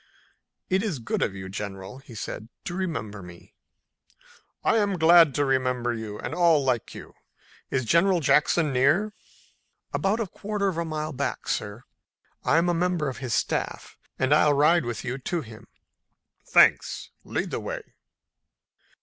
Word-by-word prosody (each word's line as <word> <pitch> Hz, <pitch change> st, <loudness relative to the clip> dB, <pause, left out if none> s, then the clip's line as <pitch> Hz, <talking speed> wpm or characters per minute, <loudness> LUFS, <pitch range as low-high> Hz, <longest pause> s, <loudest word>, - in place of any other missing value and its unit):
"It's 190 Hz, -3 st, 0 dB
good 115 Hz, -, -3 dB
of 100 Hz, -, 0 dB
you, 95 Hz, -1 st, -7 dB
General," 95 Hz, +3 st, -7 dB
he 130 Hz, -4 st, -14 dB
said, 110 Hz, +1 st, -6 dB, 0.2 s
"to 175 Hz, -, -4 dB
remember 115 Hz, -, -4 dB
me." 90 Hz, -1 st, -13 dB, 1.1 s
"I'm 205 Hz, -4 st, +2 dB
glad 165 Hz, -3 st, +6 dB
to 145 Hz, -, +2 dB
remember 125 Hz, -2 st, 0 dB
you 110 Hz, -2 st, -6 dB
and 120 Hz, -, -5 dB
all 165 Hz, -4 st, +4 dB
like 125 Hz, -4 st, -1 dB
you. -, -, -10 dB, 0.6 s
Is 130 Hz, -2 st, -1 dB
General 175 Hz, -, +3 dB
Jackson 150 Hz, 0 st, +3 dB
near?" 155 Hz, +12 st, +2 dB, 0.8 s
"About 200 Hz, +4 st, +1 dB
a 225 Hz, -, 0 dB
quarter 200 Hz, +1 st, -2 dB
of 175 Hz, -, -5 dB
a 170 Hz, -, -1 dB
mile 155 Hz, -1 st, -3 dB
farther 135 Hz, -, -10 dB
back, 140 Hz, -, -3 dB
sir. 105 Hz, +3 st, -3 dB, 0.6 s
I'm 165 Hz, +3 st, +3 dB
a 175 Hz, -, +2 dB
member 170 Hz, -3 st, 0 dB
of 130 Hz, -, -7 dB
his 125 Hz, -4 st, -2 dB
staff, -, -, -2 dB, 0.2 s
and 130 Hz, +2 st, +2 dB
I'll 150 Hz, -1 st, +5 dB
ride 155 Hz, +2 st, +4 dB
with 120 Hz, -2 st, -4 dB
you 130 Hz, +2 st, -3 dB
to 170 Hz, +5 st, -2 dB
him." 110 Hz, -5 st, -12 dB, 0.8 s
"Thanks. -, -, +3 dB
Lead -, -, -3 dB
the -, -, -2 dB
way." -, -, -5 dB
145 Hz, 155 wpm, -26 LUFS, 120-175 Hz, 1.1 s, glad